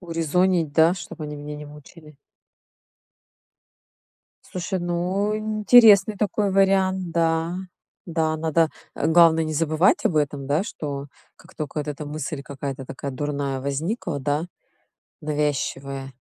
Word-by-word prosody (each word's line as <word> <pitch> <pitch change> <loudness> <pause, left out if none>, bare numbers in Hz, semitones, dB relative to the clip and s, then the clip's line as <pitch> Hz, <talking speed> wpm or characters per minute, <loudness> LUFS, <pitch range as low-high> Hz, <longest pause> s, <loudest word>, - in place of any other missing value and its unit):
Урезонить, 170 -1 0
да, 160 +3 +4
чтоб 180 -3 -9
они 150 -1 -5
меня 150 +1 -7
не 150 0 -8
мучили. 150 +1 -14 2.3
Слушай, 185 +1 -4
ну, 180 +4 -1
интересный 215 0 +5
такой 205 0 0
вариант, 190 -2 +2
да. 165 +1 0 0.5
Да, 160 -2 0
надо, 160 0 +1 0.2
э, - - -1
главное- 165 -1 +5
не 155 - -3
забывать 160 +3 +2
об 160 - +1
этом, 145 -2 -1
да, 150 +6 +1
что 145 -8 -6 0.3
как - - -19
тока 155 -1 -5
вот 150 - -6
эта 150 0 -5
мысль 150 -1 -5
какая-то 135 -2 -6
такая 140 +1 -6
дурная 140 -1 -3
возникла, 150 - -3
да, 145 +5 -1 0.8
навязчивая 140 -2 -2
160 Hz, 125 wpm, -23 LUFS, 145-180 Hz, 2.3 s, интересный